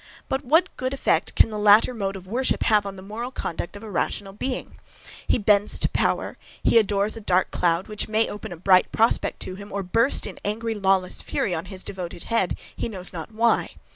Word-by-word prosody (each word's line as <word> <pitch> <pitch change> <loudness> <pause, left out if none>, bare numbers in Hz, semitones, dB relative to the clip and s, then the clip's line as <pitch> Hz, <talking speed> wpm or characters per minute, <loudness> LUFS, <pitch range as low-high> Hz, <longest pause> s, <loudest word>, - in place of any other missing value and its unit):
But 265 +2 -2
what 320 +7 +2
good 255 +1 -2
effect - - +1
can - - +5
the 210 - -4
latter 210 +4 +6
mode 195 -4 -3
of 185 -1 -9
worship 245 +7 0
have 210 -2 +3
on 195 - -6
the 190 - -10
moral 220 +5 -5
conduct 175 -7 -5
of 205 - -10
a 215 - -8
rational 195 +2 -2
being? 255 +5 -5 0.5
He - - +3
bends 205 -1 +3
to - - +2
power; - - -1 0.2
he 230 - +5
adores 205 0 +1
a 225 - -6
dark 185 -2 +1
cloud, 170 +1 +1
which 210 -1 -2
may 220 +1 +1
open 210 0 -7
a 175 - -7
bright 185 +2 +4
prospect 225 +1 +1
to - - -3
him, 200 +2 -10
or 200 0 -3
burst 230 +8 +2
in - - -7
angry, 225 +2 -2
lawless 190 -3 +1
fury 185 - -1
on 165 +1 -3
his 185 0 -5
devoted 175 -3 -6
head, 230 -6 0 0.2
he - - -3
knows 185 -4 -6
not 170 +5 -7
why. 230 +2 +1
205 Hz, 215 wpm, -24 LUFS, 190-225 Hz, 0.5 s, latter